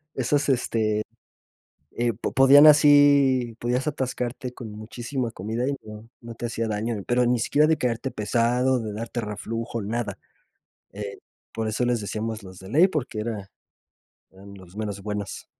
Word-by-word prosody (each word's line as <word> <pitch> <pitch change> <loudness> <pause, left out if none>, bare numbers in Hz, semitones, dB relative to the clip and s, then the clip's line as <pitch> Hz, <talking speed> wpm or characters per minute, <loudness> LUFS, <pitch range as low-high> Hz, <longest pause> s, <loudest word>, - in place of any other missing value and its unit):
esos, 135 +3 0
este, 110 -5 0 0.9
eh, 120 -1 -1
po 110 - -4
podían 140 +3 +8
así 145 -5 +5
podías 125 +3 -1
atascarte 130 -3 -3
con 115 -3 -8
muchísima 120 +3 -4
comida, 115 +6 -3
y 140 - -1
no 105 +1 -11
no 115 0 -8
te 120 - -5
hacía 115 -1 -2
daño, 110 +2 -2
pero 125 0 +2
ni 120 0 +2
siquiera 145 +6 +3
de 160 0 +3
quedarte 125 0 -2
pesado, 120 +3 +1
de 110 -2 -5
darte 115 +2 -4
reflujo, 115 +2 -4
nada. 105 -2 -3 0.7
Eh, 100 -1 -7 0.3
por 110 -1 -3
eso 110 +3 0
les 120 -2 +1
decíamos 110 +1 -4
los 95 -1 -12
de 95 - -11
ley, 160 - +5
porque 140 - -3
era 105 -3 -5 0.8
eran 100 +1 -14
los 95 -1 -15
meros 105 -2 -4
buenos. 105 -1 -5
115 Hz, 160 wpm, -25 LUFS, 105-130 Hz, 0.9 s, podían